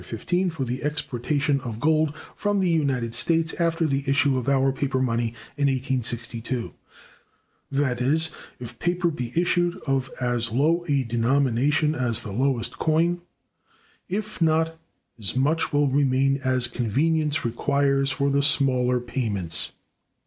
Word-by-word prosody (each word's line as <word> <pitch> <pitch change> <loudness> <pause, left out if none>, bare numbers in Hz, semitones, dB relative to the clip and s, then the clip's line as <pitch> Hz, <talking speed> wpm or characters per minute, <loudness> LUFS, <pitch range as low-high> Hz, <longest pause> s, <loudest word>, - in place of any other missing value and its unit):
XV, 180 0 -1
for 150 -5 -3
the 125 +2 -4
exportation 145 -1 -1
of 115 -4 -6
gold 155 +2 +2 0.2
from 205 -1 0
the 190 - +2
United 135 -8 0
States 160 +6 +2
after 165 -1 +1
the 140 -2 0
issue 140 0 +3
of 130 +1 -1
our 135 -1 +3
paper 135 0 -1
money 115 -2 0 0.2
in 145 -1 +2
1862]: 125 -2 -2 1.0
that 135 -3 0
is, 155 +5 +2 0.3
if 120 -1 -9
paper 175 0 +1
be 125 -6 -5
issued 175 +1 +1
of 135 -2 0
as 120 -2 -1
low 155 +8 +2
a 140 -2 +2
denomination 135 +5 +1
as 120 -6 -1
the 105 - -6
lowest 125 +2 -1
coin; 170 +3 +1 0.9
if 210 +1 -4
not, 160 0 +2 0.4
as 105 +1 -3
much 145 +5 +1
will 145 0 +3
remain 135 0 +2
as 130 -1 +2
convenience 145 +6 0
requires 140 +3 +1
for 140 +1 0
the 140 0 +2
smaller 130 -3 +2
payments. 105 - -1
135 Hz, 140 wpm, -24 LUFS, 125-155 Hz, 1.0 s, issue